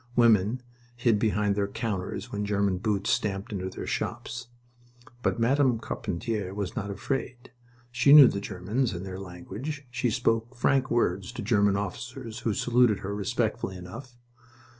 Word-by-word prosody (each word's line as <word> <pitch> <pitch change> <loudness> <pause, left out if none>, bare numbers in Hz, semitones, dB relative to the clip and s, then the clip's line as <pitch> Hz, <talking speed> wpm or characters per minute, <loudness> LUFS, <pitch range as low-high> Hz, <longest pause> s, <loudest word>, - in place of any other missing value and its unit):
Women 115 0 +4 0.3
hid 120 -3 +2
behind 105 -1 +1
their 100 0 0
counters 100 -3 -4
when 105 0 -2
German 100 -2 +1
boots 100 -1 0
stamped 100 +1 -1
into 95 -2 -3
their - - -7
shops. 120 +1 -4 0.7
But 120 - 0
Madame 130 +1 +3
Carpentier 100 -2 -3
was 100 0 -3
not 105 -4 -3
afraid. 125 +4 -4 0.4
She 125 +3 +4
knew 145 -3 +11
the 100 - -1
Germans 105 +6 -1
and 90 +2 -5
their 95 -1 -6
language. 100 - -7
She 125 0 0
spoke 115 +1 0
frank 130 +2 +2
words 95 -5 0
to - - -5
German 100 -2 +3
officers, 115 +3 -5
who 110 -4 -1
saluted 120 -3 +3
her 100 +1 -4
respectfully 95 -1 -1
enough. 115 +8 -10
105 Hz, 150 wpm, -27 LUFS, 100-120 Hz, 0.7 s, knew